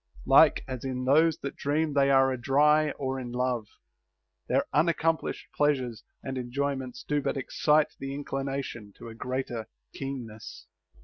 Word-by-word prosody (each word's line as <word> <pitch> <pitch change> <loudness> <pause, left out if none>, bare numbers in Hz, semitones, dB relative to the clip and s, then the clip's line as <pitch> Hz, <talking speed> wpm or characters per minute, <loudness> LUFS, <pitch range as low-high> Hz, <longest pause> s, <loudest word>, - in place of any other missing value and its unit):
Like - - +6
as 130 -2 -5
in 130 -1 -3
those 155 +4 +4
that 140 - -4
dream 150 +2 0
they 140 -1 +3
are 135 -1 +4
adry 150 +4 +3
or 135 -1 -2
in 125 -2 -6
love, 125 -3 -1 0.8
their - - +2
unaccomplished 165 +1 +1
pleasures 130 -6 0 0.2
and 130 -1 -4
enjoyments 130 0 -3
do 150 -1 0
but 135 - -2
excite 150 +3 +2
the 135 0 -5
inclination 135 -6 -4
to - - -9
a - - -9
greater 120 -1 -4 0.3
keenness. 120 -6 -7
135 Hz, 140 wpm, -28 LUFS, 125-145 Hz, 0.8 s, Like